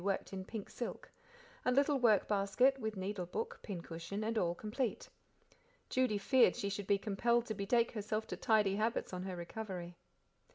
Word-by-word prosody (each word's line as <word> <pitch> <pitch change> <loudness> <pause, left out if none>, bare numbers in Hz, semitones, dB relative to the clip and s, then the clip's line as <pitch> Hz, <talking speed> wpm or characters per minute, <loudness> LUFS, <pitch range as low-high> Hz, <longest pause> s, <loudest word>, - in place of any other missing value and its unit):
worked 195 0 -1
in 190 -1 -4
pink 210 +1 -6
silk; 240 - -6 0.5
a - - +2
little 280 +2 +3
work 220 -5 +4
basket, 215 +7 +3
with 220 -3 -3
needle 190 -1 -3
book, 460 - -4
pin 195 -5 -5
cushion, 170 +6 -5
and 225 +1 -1
all 175 -5 +1
complete. 220 +5 -2 0.8
Judy 255 -5 +2
feared 240 -1 +4
she 200 - -2
should 200 -1 -4
be 200 - +4
compelled 230 +4 +1
to 220 - -3
betake 225 +3 +2
herself 215 0 -2
to - - -2
tidy 210 -3 +3
habits 220 -2 -1
on 180 - -3
her 185 0 -4
recovery. 175 -1 -6
210 Hz, 175 wpm, -35 LUFS, 195-235 Hz, 0.8 s, work